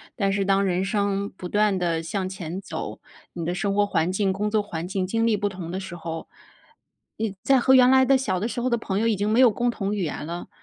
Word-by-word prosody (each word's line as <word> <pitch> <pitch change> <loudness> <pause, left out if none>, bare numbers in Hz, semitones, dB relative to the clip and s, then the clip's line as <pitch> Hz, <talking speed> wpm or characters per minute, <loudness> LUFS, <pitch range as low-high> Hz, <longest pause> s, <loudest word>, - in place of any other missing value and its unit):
但 195 -3 +1
是 195 0 0
当 195 0 +3
人 185 0 0
生 200 0 0
不 180 -2 -7
断 210 -1 +2
地 165 -2 0
向 185 +2 -3
前 185 -1 -6
走， - - -6 0.3
你 170 - -5
的 175 +2 -2
生 200 +1 -1
活 205 - +3
环 180 -4 0
境 195 0 +1
工 210 +2 -2
作 215 - +2
环 175 -4 -5
境 190 -1 -2
经 225 +3 0
历 225 -2 +3
不 205 0 -1
同 180 -3 -7
的 190 - -3
时 185 -2 -7
候， 165 -1 -6 0.9
你 215 -3 -2
再 270 -2 +4
和 260 +2 +4
原 255 -1 +7
来 260 0 +6
的 270 +1 +4
小 190 -9 0
的 210 - -1
时 240 +1 -4
候 255 - 0
的 235 - +2
朋 200 -3 -2
友 230 - +1
已 220 - +2
经 205 +2 -1
没 220 +3 +2
有 255 -2 +8
共 240 +3 0
同 205 -2 -2
语 195 - -1
言 150 - -4
了， 170 +3 -6
200 Hz, 280 characters per minute, -24 LUFS, 185-220 Hz, 0.9 s, 有